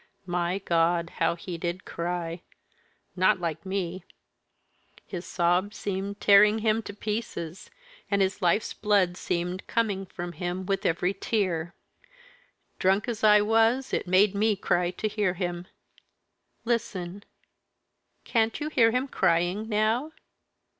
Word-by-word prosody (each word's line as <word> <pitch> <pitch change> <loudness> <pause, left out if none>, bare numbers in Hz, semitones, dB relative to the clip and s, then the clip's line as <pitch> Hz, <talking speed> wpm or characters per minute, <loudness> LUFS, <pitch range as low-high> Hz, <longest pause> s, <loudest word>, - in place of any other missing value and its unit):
My 175 0 -1
God, 170 -2 +1
how - - +2
he 170 0 -7
did 175 +2 -4
cry! 170 0 -4 0.7
not 185 0 +3
like 170 +1 -4
me. 185 -2 -3 1.0
His 180 -2 -7
sobs 180 +4 +1
seemed 200 0 -4
tearing 210 +1 +6
him 220 +1 +3
to 205 - -8
pieces, 210 -6 -5 0.4
and 200 - +2
his 190 0 0
life's 180 +4 +1
blood 200 -4 +2
seemed 180 +1 -3
coming 200 -4 -1
from 175 -1 -6
him 180 +1 -4
with 195 0 0
every 175 +3 0
tear. 180 -5 -1 1.0
Drunk 190 +4 +2
as 230 -3 -4
I 210 -1 +7
was, 225 +5 +2
it - - -1
made 190 +2 +4
me 210 +1 +2
cry 175 -2 +1
to 185 +4 -3
hear 205 -3 0
him. 175 -1 -4 1.0
Listen! 205 -5 -2 1.0
Can't 225 -1 +1
you 300 0 -3
hear 240 -7 +4
him 250 +4 0
crying 185 +1 +1
now? 225 +8 +1
190 Hz, 130 wpm, -27 LUFS, 175-210 Hz, 1.0 s, I